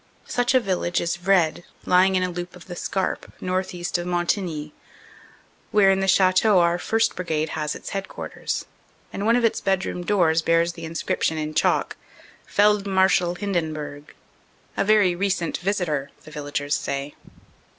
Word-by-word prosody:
Such 245 +1 0
a - - +7
village 185 -5 -1
is 170 0 -1
Vred, 175 -3 +2 0.2
lying 185 +1 +4
in 185 - +2
a 180 - 0
loop 175 +1 -6
of 180 - -13
the 175 - -8
Scarpe, 190 +1 -3
northeast 180 -1 -2
of 175 - -4
Montigny, 175 -3 -1 1.0
where 200 -2 +5
in 190 - +2
the 195 - 0
chateau 190 +2 +4
our 170 0 +3
1st. 225 +4 +1
Brigade 160 -3 -2
has 150 -1 -3
its - - -8
headquarters, 195 0 -4 0.5
and 200 +2 -2
one 230 - +5
of 245 -1 +2
its 225 - +1
bedroom 190 -2 -1
doors 170 -4 +2
bears 165 +1 +2
the 165 -1 -8
inscription 160 0 -1
in 155 0 -3
chalk: - - +1 0.5
"Feldmarschall 195 -3 +3
Hinden 175 -6 -1
burg" 145 -1 -8 0.6
a - - +1
very 205 -3 +4
recent 185 -2 -1
visitor, 175 -7 -1
the 155 - -13
villagers 145 -1 -3
say. 140 +1 -3
180 Hz, 155 wpm, -23 LUFS, 165-195 Hz, 1.0 s, a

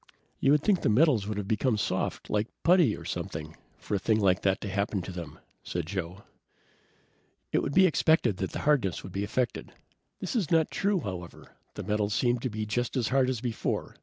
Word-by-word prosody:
"You 135 - +2
would 150 0 +2
think 200 -4 +3
the - - +2
metals 120 -3 +4
would 105 -1 -3
have 100 -2 -3
become 110 +2 +1
soft, - - -2
like 105 +1 0 0.2
putty, 170 - +4
or - - -10
something, 80 0 -5 0.2
for - - -6
a 100 - +2
thing 110 +3 +2
like 95 -2 +3
that 95 +1 +1
to - - -4
happen 100 -1 -1
to 95 - -6
them," 85 -2 -7 0.2
said 85 -2 -4
Joe. 95 +1 -5 1.3
"It - - +2
would 140 - -3
be 190 +1 +7
expected 160 - +3
that 95 - -2
the - - -4
hardness 130 - +2
would 95 - -8
be 100 - -2
affected. 125 +4 -2 0.5
This - - -4
is 200 -10 0
not 165 -2 +3
true, 200 -2 +1
however. 90 -6 -8 0.2
The - - -5
metals 105 0 0
seem 120 -1 +2
just 115 +1 -2
as 120 -4 0
hard 130 -1 +3
as 125 -4 -2
before. 120 -3 -3
110 Hz, 200 wpm, -28 LUFS, 100-135 Hz, 1.3 s, be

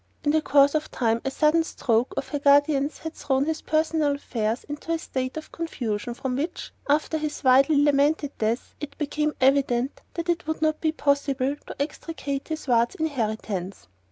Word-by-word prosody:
In 290 - +2
the 315 +1 +3
course 280 -1 +4
of 310 0 -1
time 230 -1 0
a 270 - -1
sudden 305 +4 +3
"stroke" 235 -6 0
of 270 - -3
the 290 - -1
guardian's 285 0 +3
had 320 0 -6
thrown 270 -2 0
his 320 0 -2
personal 310 -2 +1
affairs 230 -4 -2
into 295 +3 -6
a 330 - +2
state 260 -3 -4
of 310 - -7
confusion 240 -8 -3
from 255 +1 -3
which 315 +6 -4 0.2
after 310 +2 +2
his 305 -1 -4
widely 270 +3 +5
lamented 290 0 +2
death 225 +3 -1
it 285 -1 -7
became 300 0 -1
evident 265 -1 +2
that 335 0 -3
it 345 -2 -1
would 315 - -2
not 310 0 +1
be 315 - +2
possible 280 -2 0
to - - -9
extricate 285 -1 -4
his 315 -2 -5
ward's 235 -1 +2
inheritance. 215 - -3
285 Hz, 180 wpm, -25 LUFS, 255-310 Hz, 0.2 s, widely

